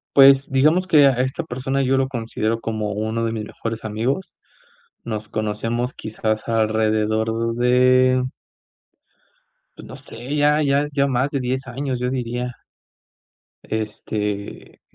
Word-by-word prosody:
Pues, 135 0 +7
digamos 155 +7 +3
que 150 -5 +6
a - - +7
esta 130 +6 -1
persona 135 -1 -2
yo 135 +1 +2
lo 135 0 +2
considero 115 -2 -2
como 110 -2 -3
1 110 +2 -2
de 115 - -1
mis 105 -2 -4
mejores 115 0 -6
amigos, 115 - -2 0.7
nos 110 -2 -4
conocemos 115 +4 -2
quizás 110 0 -3
alrededor 110 +1 +1
de 125 +1 +4 1.5
pues - - -11
no - - -9
sé, 125 +6 -6
ya 150 +1 +3
ya 140 +1 +2
ya 140 0 +2
más 130 +2 0
de 140 -2 -1
10 130 +1 -2
años, 130 0 -3
yo 125 - -1
diría. 125 -1 -3 1.1
Este, 105 -1 -4
120 Hz, 135 wpm, -21 LUFS, 110-135 Hz, 1.5 s, Pues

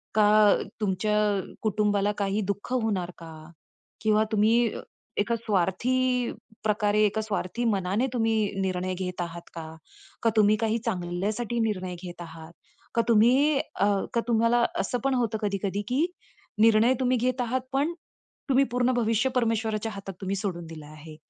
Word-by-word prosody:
का 210 -1 +6 0.3
तुमच्या 210 +1 0 0.4
कुटुंबाला 210 -1 +1
काही 200 +1 0
दुःख 200 +4 -8
होणार 210 -8 0
का? 165 -1 -10 0.7
किंवा 215 0 +3
तुम्ही 225 +2 +3 0.5
एका 235 +3 +1
स्वार्थी 235 +5 0 0.3
प्रकारे, 210 -1 +1
एका 210 +1 0
स्वार्थी 215 +1 -3
मनाने 200 +2 +1
तुम्ही 225 -2 +1 0.3
निर्णय 185 -1 -1
घेत 180 -1 -4
आहात 170 0 -5
का? 160 -1 -8 0.5
का 230 - +4
तुम्ही 210 0 +5
काही 225 0 +1
चांगल्यासाठी 210 +4 -2
निर्णय 185 -5 -1
घेत 175 -1 -8
आहात? 165 -1 -10 0.4
का 230 - +4
तुम्ही, 250 +6 +4
अ, - - -1 0.3
का 235 - +2
तुम्हाला 235 +1 +3
असं 245 +5 -1
पण 275 - +2
होतं 230 -3 0
कधी-कधी 200 -1 -1
की 265 +6 +2 0.6
निर्णय 225 +2 +5
तुम्ही 255 -1 +2
घेत 250 +1 0
आहात. 250 +2 -1
पण 285 +5 +1 0.6
तुम्ही 270 +1 +5
पूर्ण 250 +1 +2
भविष्य 230 +1 +1
परमेश्वराच्या 225 -2 0
हातात 195 -1 -7
तुम्ही 195 0 -2
सोडून 185 -4 -3
दिलं 160 -2 -9
आहे, 155 +1 -12
215 Hz, 145 wpm, -26 LUFS, 190-235 Hz, 0.7 s, का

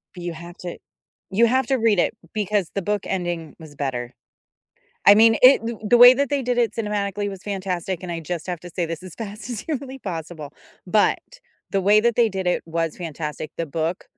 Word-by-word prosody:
You 175 -1 -5
have 170 +2 -11
to 175 -1 -6 0.5
you 230 +4 +4
have 260 +1 +2
to 270 - +2
read 225 -4 +2
it - - +2 0.2
because 205 -4 0
the 200 - 0
book 205 +1 -1
ending 175 -4 -3
was 155 -2 -12
better. 125 -4 -3 0.9
I 200 - +10
mean, 225 +1 +6
it 260 +2 +8
th 235 -1 -3
the 240 - +5
way 245 +1 +10
that 280 +1 0
they 280 -2 0
did 245 0 -1
it 235 -2 +2
cinematically 205 -2 -2
was 195 -2 -8
fantastic, 190 -3 -3
and 180 - -6
I 165 - -4
just 165 +1 -5
have 175 -2 -4
to 175 - -10
say 175 -2 -1
this 165 +2 -6
as 185 -3 -10
fast 215 +2 -7
as 225 - -4
humanly 270 -3 -5
possible, 160 - -6 0.3
but 210 +3 +2 0.5
the 195 - +1
way 210 +2 +5
that 235 0 +1
they 235 -2 +4
did 190 -1 -4
it 180 - +1
was 165 -1 -2
fantastic. 155 -3 -5
The 165 - -2
book 160 +4 -3
190 Hz, 210 wpm, -23 LUFS, 170-225 Hz, 0.9 s, I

